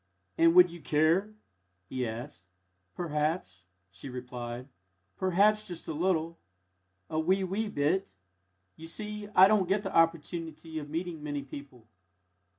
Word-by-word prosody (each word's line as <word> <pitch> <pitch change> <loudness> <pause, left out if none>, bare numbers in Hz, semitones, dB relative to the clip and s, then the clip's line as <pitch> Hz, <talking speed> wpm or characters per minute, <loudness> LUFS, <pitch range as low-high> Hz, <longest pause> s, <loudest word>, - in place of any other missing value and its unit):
"And 165 +1 +5
would 180 -1 +8
you 170 -1 -10
care?" 165 +9 +2 0.5
he 130 -2 -2
asked. 110 -5 -7 0.5
"Perhaps," 150 - -2 0.2
she 95 +8 -9
replied; 125 -1 -6 0.5
"perhaps, 205 +4 +3
just 175 -2 -8
a - - -2
little 165 0 0 0.7
a 155 - -2
wee, 190 +4 +2
wee 205 +4 -2
bit. 170 +5 0 0.6
You 160 - -9
see, 210 +4 -5
I 190 +1 +9
don't 200 -3 +2
get 200 +1 +2
the 195 - -4
opportunity 165 -1 0
of 145 -1 -8
meeting 165 0 -4
many 145 -1 -3
people!" 135 -4 -11
165 Hz, 135 wpm, -30 LUFS, 145-185 Hz, 0.7 s, I